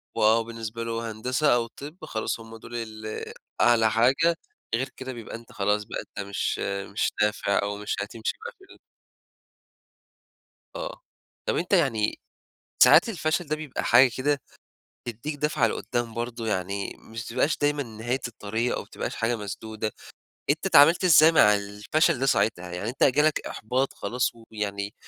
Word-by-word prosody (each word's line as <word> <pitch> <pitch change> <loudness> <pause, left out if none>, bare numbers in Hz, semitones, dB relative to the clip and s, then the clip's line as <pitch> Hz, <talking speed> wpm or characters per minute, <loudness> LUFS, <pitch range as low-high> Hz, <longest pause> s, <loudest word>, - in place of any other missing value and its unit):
وآه، 110 +2 +4
بالنسبة 115 0 -6
لهم 115 0 -2
هندسة 115 +6 0
أو 115 -1 0
طِب 150 +8 -10
خلاص 110 +1 -3
هم 115 0 -11
دول 120 +2 -10
ال 110 -2 -5 0.4
أعلى 115 -2 +5
حاجة، 135 +9 +3 0.4
غير 130 +3 -2
كده 130 0 -6
بيبقى 115 -2 -8
أنتَ 115 0 -12
خلاص 105 +1 0
بقى - - -5
أنتَ 100 0 -8
مش 100 - -2 0.3
مش - - +1
نافع 105 -1 +2
أو 100 0 -3
مش 105 - -3
هتمشي 110 +2 -3
بقى 475 - -4
في 385 - -20
ال - - -20 2.0
آه، - - -6 0.4
طَب - - 0
أنتَ 205 - -2
يعني 120 - +2 0.6
ساعات - - +7
الفشل 170 -3 -1
ده 155 - 0
بيبقى 155 -4 -5
حاجة 125 +2 +6
كده 140 0 +1 0.6
تدّيك 120 +6 -5
دَفْعَة 150 -4 +1
لقدّام 120 0 -3
برضه، 115 0 -4
يعني 100 0 -2
مش 115 +1 -12
ما 115 - -9
تبقاش 155 - +2
دايمًا 145 0 +1
نهاية 120 +2 -3
الطريق، 110 +2 -2
أو - - -2
ما - - -18
تبقاش - - -4
حاجة 115 +1 0
مسدودة، 110 +1 -5 0.6
أنتَ - - 0
اتعاملت 165 +6 +6
إزاي 160 -1 +7
مع 105 -9 +6
الفشل 105 - 0
ده 135 - 0
ساعتها؟ 100 -7 +1
يعني 95 +5 -4
أنتَ 130 - +1
جالك 150 +3 +3
إحباط 130 +5 -1
خلاص 125 +1 -1
ويعني 105 -3 -5
115 Hz, 160 wpm, -26 LUFS, 110-140 Hz, 2.0 s, ساعات